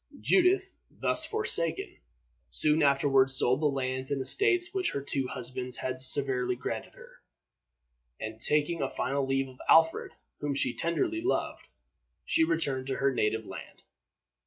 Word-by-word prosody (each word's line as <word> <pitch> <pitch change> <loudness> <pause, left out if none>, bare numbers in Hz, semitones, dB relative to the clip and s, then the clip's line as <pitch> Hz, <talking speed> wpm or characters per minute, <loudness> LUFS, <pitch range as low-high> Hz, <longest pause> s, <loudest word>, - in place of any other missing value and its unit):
Judith, 380 +1 +3 0.2
thus - - -1
forsaken, 420 - -1 0.5
soon 155 +1 +2
afterward 135 -2 +4
sold 130 +1 +3
the 150 - +3
lands 130 -1 -2
and 140 -1 -1
estates 360 - +1
which 380 -1 -1
her 140 - -2
two 135 -2 0
husbands 125 0 -5
had 130 0 -3
severally 130 -2 0
granted - - -5
her, - - -16 1.0
and, 110 +1 -6
taking 150 +3 +1
a - - 0
final 140 0 -1
leave 135 0 0
of 130 -1 -15
Alfred, 165 0 +4 0.3
whom 145 -1 -2
she - - 0
tenderly 330 - -1
loved, 365 - -2 0.6
she 160 - +2
returned 145 -5 0
to 135 - -1
her 135 0 +1
native 110 -2 0
land. - - -10
140 Hz, 145 wpm, -29 LUFS, 130-165 Hz, 1.0 s, afterward